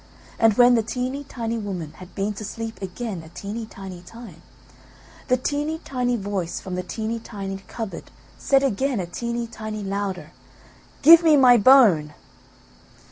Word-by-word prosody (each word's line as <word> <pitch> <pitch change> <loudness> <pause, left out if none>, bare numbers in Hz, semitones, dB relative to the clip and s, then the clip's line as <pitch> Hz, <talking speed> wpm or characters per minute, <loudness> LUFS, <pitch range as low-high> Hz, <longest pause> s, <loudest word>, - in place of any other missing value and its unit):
And 225 -2 +4
when 245 +1 +6
the 230 - +4
teeny 255 +5 -4
tiny 230 -2 -4
woman 180 -7 -5
had 185 0 -13
been 200 +2 -1
to 210 - -8
sleep 225 +1 -6
again 195 0 -5
a 160 - -13
teeny 210 +6 -6
tiny 190 -4 -9
time, 185 -3 -12 0.9
the 255 - +3
teeny 295 +4 -2
tiny 250 -5 -2
voice 195 -5 -3
from 185 - -7
the 180 - -2
teeny 220 +5 -4
tiny 195 -4 -6
cupboard 225 -4 -7 0.3
said 275 0 +2
again 265 0 0
a 180 - -2
teeny 235 +6 -4
tiny 215 -2 -6
louder, 195 -2 -4 0.7
"Give 330 +3 +10
me 315 -3 +5
my 255 -3 +7
bone!" 200 - +5
220 Hz, 155 wpm, -23 LUFS, 195-245 Hz, 0.9 s, Give